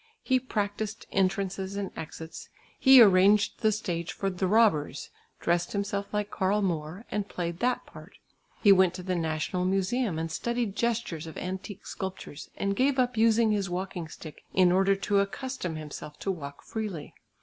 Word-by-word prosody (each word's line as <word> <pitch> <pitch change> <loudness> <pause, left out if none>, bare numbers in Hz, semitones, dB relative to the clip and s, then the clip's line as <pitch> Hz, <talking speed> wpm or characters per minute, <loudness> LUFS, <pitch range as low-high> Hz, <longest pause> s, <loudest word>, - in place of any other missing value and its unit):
He 260 -1 +3
practised 215 -3 -3
entrances 195 0 0
and 200 -1 -3
exits; 160 0 -8 0.3
he 265 -1 +8
arranged 200 +1 +4
the 220 -2 +4
stage 175 -5 -3
for 195 -1 -2
"The 185 +1 -1
Robbers," 205 -8 +2 0.3
dressed 175 0 0
himself 200 0 -2
like 210 0 -2
Karl 200 +2 +1
Moor, 170 +3 -3
and 205 -1 -2
played 170 -1 -4
that 250 0 0
part. - - -14 0.5
He 205 - +8
went 185 -2 +5
to 180 - -7
the 185 0 -1
National 165 +2 -1
Museum 195 +2 0
and 165 0 -3
studied 235 0 -2
gestures 225 -9 -1
of 160 - -9
antique 190 +2 -6
sculptures 190 -6 -6
and 200 0 0
gave 265 +4 +2
up 250 -1 +1
using 225 0 +4
his 200 -3 0
walking 180 -2 -4
stick 155 0 -11
in 185 -1 +5
order 195 +2 +4
to 200 +1 +1
accustom 200 -2 -3
himself 150 -1 -8
to 195 - 0
walk 140 -6 -7
freely. 205 -9 -5
195 Hz, 165 wpm, -28 LUFS, 175-210 Hz, 0.5 s, he